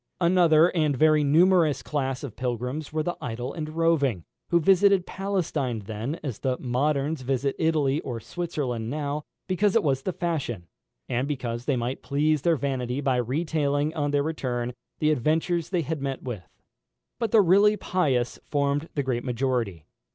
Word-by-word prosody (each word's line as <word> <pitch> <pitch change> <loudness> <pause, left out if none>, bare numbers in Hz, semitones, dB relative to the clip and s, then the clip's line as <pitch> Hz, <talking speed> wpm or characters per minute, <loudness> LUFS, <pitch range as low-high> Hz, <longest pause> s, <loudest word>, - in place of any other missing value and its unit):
Another 170 -2 +5
and 150 -5 +2
very 155 +1 +4
numerous 165 +1 +4
class 135 -3 -2
of 130 -7 -6
pilgrims 125 +4 -3
were 155 0 -1
the 175 +2 -2
idle 120 +3 -4
and 155 -3 -5
roving, 155 - +1 0.3
who 170 - +4
visited 195 +2 +4
Palestine 160 - -2
then 115 +9 -4
as 130 -8 -4
the 130 -2 -1
moderns 140 +4 0
visit 135 +1 -1
Italy 155 -3 +2
or 120 -3 -5
Switzerland 130 -8 -3
now, 145 +1 -2 0.2
because 195 +2 +1
it 225 - +4
was 135 -2 +1
the 185 - -2
fashion, 150 - -3 0.4
and 125 +3 -1
because 125 -4 -3
they 140 - +1
might 120 +2 -3
please 150 +1 +1
their 165 +1 +2
vanity 130 -2 -2
by 135 -3 +1
retailing, 145 +3 0
on 145 -3 -1
their 145 0 +1
return, 125 -6 -2 0.2
the 155 0 +2
adventures 160 +4 0
they 180 -3 0
had 155 0 -3
met 135 -1 -3
with. 110 -10 -6 0.7
But 230 -2 0
the 215 +1 +6
really 200 +3 +5
pious 135 -13 0
formed 145 +2 0
the 140 - 0
great 125 -2 -1
majority. 120 - -1
145 Hz, 165 wpm, -26 LUFS, 125-165 Hz, 0.7 s, the